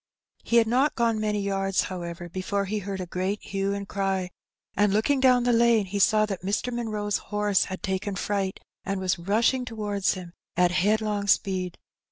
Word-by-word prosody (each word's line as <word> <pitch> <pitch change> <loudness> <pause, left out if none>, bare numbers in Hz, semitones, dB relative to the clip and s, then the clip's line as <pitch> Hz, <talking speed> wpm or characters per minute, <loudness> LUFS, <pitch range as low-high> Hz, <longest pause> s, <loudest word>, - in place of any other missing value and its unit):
He 235 - -1
had 230 -1 +6
not 255 +6 +2
gone 230 -2 +1
many 210 -1 0
yards, 195 -1 0
however, 175 -2 -6
before 190 +3 -2
he 210 +2 -2
heard 195 -1 -5
a 185 - -3
great 185 +4 -2
hue 195 0 -2
and 200 0 -5
cry, 190 -2 -1 0.4
and, 205 -1 +3
looking 220 +7 +2
down 255 -2 +5
the 245 0 +3
lane, 230 -2 +4
he 200 +2 -3
saw 215 +2 +4
that 195 -3 -5
Mr. 205 +6 -1
Munroe's 215 -3 -1
horse 210 -2 +2
had 190 -1 -7
taken 190 +1 -2
fright, 195 0 -2 0.2
and 195 -1 -2
was 185 -2 0
rushing 225 +8 +2
towards 210 -5 -1
him 180 -2 -9 0.2
at 180 -1 +4
headlong 205 +2 +1
speed. 185 -3 +1
200 Hz, 185 wpm, -26 LUFS, 190-215 Hz, 0.4 s, had